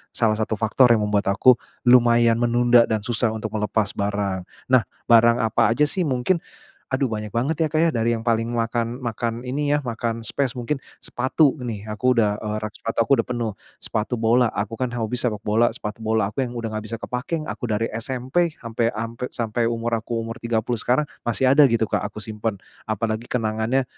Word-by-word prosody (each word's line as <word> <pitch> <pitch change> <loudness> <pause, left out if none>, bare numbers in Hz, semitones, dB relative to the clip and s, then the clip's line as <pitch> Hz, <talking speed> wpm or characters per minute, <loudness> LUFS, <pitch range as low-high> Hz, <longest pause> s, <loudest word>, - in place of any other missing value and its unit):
salah 110 -2 +2
satu 110 0 -1
faktor 115 +4 +4
yang 105 - 0
membuat 105 -1 0
aku 120 +5 +5 0.2
lumayan 120 -2 +5
menunda 120 0 +4
dan 110 -2 -1
susah 115 -1 0
untuk 110 - -5
melepas 105 0 0
barang. 100 -2 -2 0.2
Nah 130 -3 +4 0.2
barang 115 +1 +6
apa 115 +1 +3
aja 150 - +3
sih 170 +2 0
mungkin? 130 +7 +1 0.5
Aduh 130 +1 0
banyak 105 -3 -3
banget 135 +9 -1
ya 160 - +3
Kak 155 +1 0
ya, 165 - +3
dari 115 0 +1
yang 115 - -7
paling 115 -1 +1
makan 115 0 -1
makan 115 +1 -3
ini 145 +3 0
ya, 145 - -4
makan 115 -1 -3
space 130 +2 -1
mungkin 130 +3 -2 0.2
sepatu 130 +3 +2
nih, 110 -4 -5
aku 120 +4 0
udah, 105 -2 +2
eee, 105 0 -3
rak 110 - -4
sepatu 115 0 0
aku 140 - 0
udah - - -5
penuh. 120 -3 -2 0.2
Sepatu 115 +3 -3
bola, 115 +2 +3
aku 105 +1 -3
kan 125 +2 -2
hobi 120 +2 -2
sepak 110 -4 -2
bola, 110 +3 +3
sepatu 105 +1 -6
bola 110 -2 0
aku 135 - -2
yang 120 -2 -3
udah 115 -2 -4
enggak 110 0 -5
bisa 115 - -3
kepakai. 140 +8 -4
Aku 120 -5 -5
dari 110 +1 -1
SMP 130 +8 -1
sampai 115 0 -1
sampai 115 +3 -4
sampai 115 0 -2
umur 115 0 -1
aku 115 +1 -4
umur 115 +1 -5
30 120 0 -1
sekarang 130 +5 +2 0.2
masih 130 +3 +3
ada 150 - +5
gitu 115 -1 +2
Kak - - -1
aku 105 -1 -8
simpen. 110 -1 -3 0.3
Apalagi 110 +2 -2
kenangannya 115 +2 0
115 Hz, 200 wpm, -23 LUFS, 110-125 Hz, 0.5 s, barang